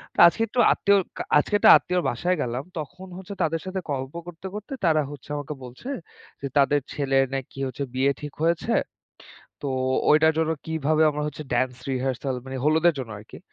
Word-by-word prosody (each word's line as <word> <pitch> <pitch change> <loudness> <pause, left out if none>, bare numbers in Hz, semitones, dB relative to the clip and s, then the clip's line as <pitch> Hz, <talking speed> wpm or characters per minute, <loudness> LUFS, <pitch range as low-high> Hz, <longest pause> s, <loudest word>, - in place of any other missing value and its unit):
তো - - -4
আজকে 200 - 0
একটু 245 - -3
আত্মীয় 200 0 +3 0.2
কা - - -2
আজকে 150 - 0
একটা - - +6
আত্মীয়র 180 0 -1
বাসায় 180 +1 0
গেলাম। 125 +2 -2 0.2
তখন 180 +5 -8
হচ্ছে 190 +2 -8
তাদের 165 0 0
সাথে 190 0 -3
গল্প 135 +1 -3
করতে, 175 +2 -8
করতে 210 +5 -7
তারা 155 -2 +4
হচ্ছে 145 -1 -11
আমাকে 145 +1 -5
বলছে, 125 - -9 0.5
যে 140 - -2
তাদের 145 +1 +4
ছেলের 135 -2 +2
নাকি 135 0 -6
হচ্ছে 140 +2 -4
বিয়ে 135 +2 +2
ঠিক 150 -2 -6
হয়েছে। 170 +7 +1 0.9
তো 145 - -2 0.4
ঐটার 160 +1 +6
জন্য 160 0 +1 0.2
কিভাবে 155 -1 +1
আমার 150 0 -3
হচ্ছে, 150 0 -5
ড্যান্স 125 0 +1
রিহার্সাল 130 +1 -1
মানে, 130 0 -6
হলুদের 160 +2 +4
জন্য 125 -4 -5
আরকি। 105 - -12
150 Hz, 180 wpm, -25 LUFS, 135-170 Hz, 0.9 s, একটা